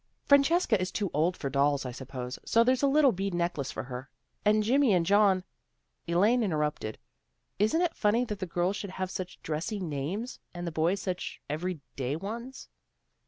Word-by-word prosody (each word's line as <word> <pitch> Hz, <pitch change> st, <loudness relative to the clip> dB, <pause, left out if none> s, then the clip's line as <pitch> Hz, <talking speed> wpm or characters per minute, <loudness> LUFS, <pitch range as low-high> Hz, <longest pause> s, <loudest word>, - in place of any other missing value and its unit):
Francesca 280 Hz, -, +4 dB
is 185 Hz, -, -1 dB
too 200 Hz, -4 st, -2 dB
old 165 Hz, +5 st, +1 dB
for 140 Hz, -, -3 dB
dolls, 140 Hz, 0 st, +1 dB
I 125 Hz, -, -3 dB
suppose, 125 Hz, 0 st, -6 dB
so 230 Hz, -, +4 dB
there's 255 Hz, +1 st, +2 dB
a 280 Hz, -, +4 dB
little 280 Hz, -1 st, +5 dB
bead 195 Hz, -1 st, -2 dB
necklace 170 Hz, -6 st, -1 dB
for -, -, -5 dB
her. 130 Hz, +1 st, -7 dB, 0.3 s
And 215 Hz, 0 st, +4 dB
Jimmy 255 Hz, +1 st, +4 dB
and 175 Hz, -2 st, +3 dB
John 195 Hz, -1 st, +4 dB, 0.3 s
" -, -, -47 dB
Elaine 205 Hz, +9 st, +3 dB
interrupted. 150 Hz, -, -1 dB, 0.3 s
" -, -, -48 dB
Isn't 220 Hz, -, +3 dB
it 340 Hz, -2 st, +1 dB
funny 230 Hz, +4 st, +2 dB
that 210 Hz, -4 st, -5 dB
the 185 Hz, -, -3 dB
girls 175 Hz, +3 st, 0 dB
should 200 Hz, -, -5 dB
have 185 Hz, 0 st, -4 dB
such 185 Hz, -1 st, -6 dB
dressy 165 Hz, +7 st, -3 dB
names, 175 Hz, -, -4 dB, 0.2 s
and 175 Hz, 0 st, -4 dB
the 170 Hz, -, -3 dB
boys 165 Hz, +5 st, +1 dB
such 185 Hz, -1 st, -4 dB
every 160 Hz, +2 st, -3 dB, 0.2 s
day 135 Hz, +1 st, -1 dB
ones? 230 Hz, +9 st, -6 dB
185 Hz, 190 wpm, -29 LUFS, 155-215 Hz, 0.3 s, little